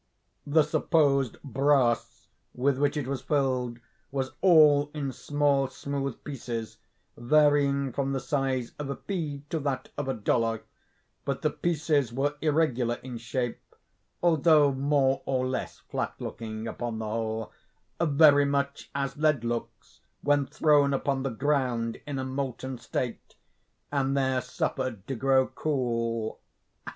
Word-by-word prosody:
The 155 +2 +5
supposed 140 -4 +2
brass 135 -3 +1 0.3
with 130 +1 +1
which 145 +2 +1
it 145 - -1
was 135 0 -3
filled 130 -5 0 0.3
was 135 -1 -2
all 150 -5 +6
in 140 -3 -2
small, 145 0 +1
smooth 135 0 -4
pieces, 120 -5 -5 0.4
varying 140 +1 +3
from 135 +1 -1
the 135 - 0
size 135 -4 -1
of 145 -2 -4
a 140 - -2
pea 155 -8 -4
to 160 - 0
that 140 -3 -3
of 145 - -2
a 135 - -1
dollar; 115 0 0 0.6
but 140 +1 -3
the 155 - +2
pieces 150 -7 0
were 140 +4 0
irregular 145 -7 +1
in 125 -2 -6
shape, 120 +1 -3 0.6
although 155 -3 +5
more 135 0 +2
or 130 -1 +1
less 130 0 -3
flat - - -4
looking, 110 0 -6
upon 115 0 -4
the 110 - -4
whole, 110 0 -3 0.5
"very 145 -2 +6
much 140 0 -1
as 140 0 -2
lead 150 -5 +2
looks 115 -2 -5 0.2
when 145 -1 +2
thrown 145 -1 +3
upon 135 0 -1
the 135 - -1
ground 125 -3 0
in 145 -2 -3
a 130 - -2
molten 130 -1 -4
state, 120 +1 -4 0.6
and 140 -1 +1
there 130 -1 +1
suffered 125 -4 -3
to 135 - -3
grow 130 +1 +3
cool." 115 -7 -2
135 Hz, 140 wpm, -28 LUFS, 125-145 Hz, 0.6 s, all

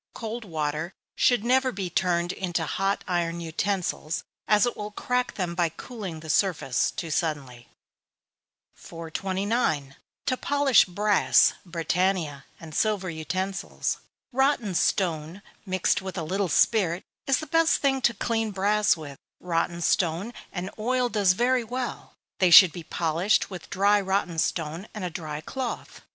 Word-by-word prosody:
Cold 230 +1 -5
water 155 0 -3 0.2
should 245 -4 +3
never 260 +1 +3
be 190 -3 -4
turned 175 0 0
into 175 -4 -2
hot 195 +5 -1
iron 170 -1 -1
utensils, 170 -1 -2 0.2
as 210 0 +5
it 245 - -2
will 210 0 -5
crack 250 +4 -2
them 180 -3 -2
by 170 -1 +1
cooling 190 -4 -7
the 160 - -10
surface 155 - +1
too 165 - -5
suddenly. 140 -7 -3 1.1
429. 165 - -2 0.3
To 255 -2 0
polish 285 -4 +4
Brass, 200 +2 +3
Britannia, 170 -4 -1
and 160 -2 -10
Silver 200 -1 0
Utensils. 185 +5 -3 0.3
Rotten 265 -6 +1
stone, 170 +1 0 0.2
mixed 185 +1 +1
with 190 0 -6
a 165 - -2
little 190 +4 -1
spirit, 175 0 +2 0.2
is 270 - +4
the - - -5
best 330 +2 +3
thing 270 -2 +1
to 240 -1 +2
clean 225 -2 -1
brass 205 0 +2
with: 145 -3 -9 0.2
rotten 170 0 -1
stone 175 +8 +1 0.2
and 185 +1 -5
oil 250 +2 +1
does 200 -5 +3
very 245 +4 +2
well. 250 +2 -5 0.3
They 185 - +4
should 180 0 +10
be 175 - -7
polished 170 +6 0
with 180 -3 -8
dry 200 +1 +3
rotten 190 -3 -1
stone, 165 +4 -2
and 210 - -5
a 180 - -3
dry 155 -2 -5
cloth. 260 +7 -5
185 Hz, 145 wpm, -26 LUFS, 165-215 Hz, 1.1 s, should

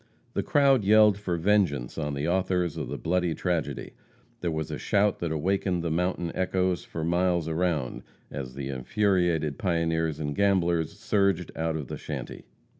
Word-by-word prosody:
The - - 0
crowd 135 -5 +3
yelled 105 0 +5
for 90 -4 -2
vengeance 85 -9 +1
on 75 -2 -2
the 70 +3 -2
authors 90 -2 0
of - - -4
the - - -4
bloody 90 -1 0
tragedy. 85 -4 -2 0.5
There 85 - -1
was 80 -1 -3
a - - -4
shout 100 0 +2
that 85 -2 -2
awakened 90 +2 0
the 85 - -1
mountain 90 0 -1
echoes 95 -1 0
for 80 - -5
miles 85 0 +1
around, 80 -6 -1 0.3
as 65 -2 -6
the 70 0 -5
infuriated 85 +1 0
pioneers 80 -3 0
and 75 -2 -3
gamblers 85 -5 +1
surged 100 -5 +1
out 80 0 -1
of 75 -3 -3
the - - -5
shanty. - - -6
85 Hz, 165 wpm, -27 LUFS, 80-95 Hz, 0.5 s, yelled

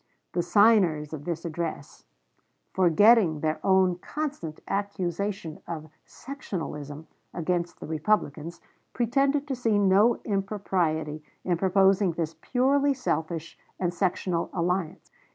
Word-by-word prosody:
The 175 - 0
signers 175 -5 +3
of 150 -1 -7
this 170 -1 -4
address, 165 -3 -5 0.7
forgetting 185 -2 +5
their 155 0 -1
own 190 -2 +3
constant 275 - -5
accusation 195 -3 -3
of 155 -2 -6 0.2
"sectionalism" 155 - -7 0.3
against 175 0 -2
the - - -7
Republicans, 160 -1 -1 0.3
pretended 275 +4 +1
to 275 - -2
see 230 -4 +1
no 205 +4 +4
impropriety 185 -7 -1 0.2
in 180 - +1
proposing 190 +1 +3
this 165 -1 -3
purely 275 +2 +2
selfish 165 - -3 0.2
and 175 -2 0
sectional 175 -1 -1
alliance. 175 -1 -2
180 Hz, 110 wpm, -27 LUFS, 160-205 Hz, 0.7 s, forgetting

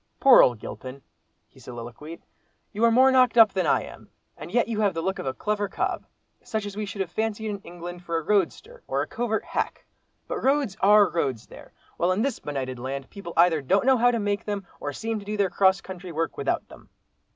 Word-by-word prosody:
"Poor 270 -2 +8
old 120 -2 +3
Gilpin!" 130 +5 -9 0.4
he - - -21
soliloquised, 120 +7 -9 0.5
"you 215 - -3
are 235 - +7
more 260 +3 +5
knocked 255 -2 +4
up 220 -3 +7
than 185 -4 0
I - - +2
am—and 170 - -13
yet 240 +1 +2
you 220 -2 -2
have 200 -4 +1
the 165 - -2
look 190 +2 -2
of - - -5
a 130 - -1
clever 210 -1 -1
cob—such 220 -4 -5
as 205 -1 -7
we 210 0 -4
should 195 0 -5
have 180 -3 -3
fancied 220 +1 -2
in 200 -1 -4
England 175 -1 -9
for 170 -1 -2
a 165 - -3
roadster, 210 - -1
or - - 0
a - - -7
covert 230 -2 -2
hack. - - -3 0.4
But - - -4
roads 270 -6 +1
are 205 +1 +6
roads 135 -10 -2
there, - - -14 0.3
while 175 +2 +2
in 205 +4 0
this 275 -3 -1
benighted 130 -3 -4
land, 135 +2 -5
people 195 -4 -8
either 165 -2 +4
don't 195 - +1
know 265 -1 +5
how 245 +1 +4
to 240 - +1
make 205 -1 -1
them, 205 -2 -3
or 145 - -4
seem 225 +9 -3
to 200 - -12
do 210 +1 -3
their 200 -2 +1
cross 190 0 +3
country 185 -1 -8
work 165 +1 -2
without - - -2
them. - - -16
195 Hz, 220 wpm, -25 LUFS, 165-220 Hz, 0.5 s, Poor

